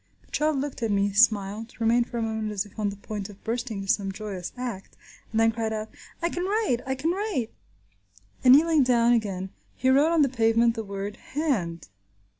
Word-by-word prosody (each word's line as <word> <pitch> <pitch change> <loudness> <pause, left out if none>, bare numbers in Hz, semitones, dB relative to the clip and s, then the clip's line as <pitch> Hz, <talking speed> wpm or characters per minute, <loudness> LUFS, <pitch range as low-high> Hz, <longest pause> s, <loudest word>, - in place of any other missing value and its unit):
The - - -29
child 305 -1 +1
looked 280 -1 -4
at 225 - 0
me, 200 0 +1
smiled, 215 0 +2
remained 235 +1 +2
for 240 - -5
a 230 - 0
moment 220 -1 -2
as 205 0 -2
if 205 +1 -14
on 210 -1 +1
the 200 - -6
point 205 0 -6
of 200 -1 -14
bursting 230 -2 -3
into 195 - +2
some 195 -2 -2
joyous 195 -3 -6
act, 240 -6 -6 0.3
and 220 - -1
then 225 0 +4
cried 225 -1 -2
out, 215 0 -4 0.3
"I 340 - +2
can 350 +1 -3
write! 405 - +1
I 265 - 0
can 300 +6 0
write!" 370 - -2 0.9
and 255 0 +9
kneeling 315 0 +4
down 240 -2 +4
again 195 -5 -1 0.2
he 260 - +1
wrote 290 +5 +4
on 330 -3 +4
the - - +4
pavement 230 -2 +3
the 225 -1 -4
word 200 0 -5
"hand." 205 - -2
225 Hz, 210 wpm, -26 LUFS, 205-260 Hz, 0.9 s, and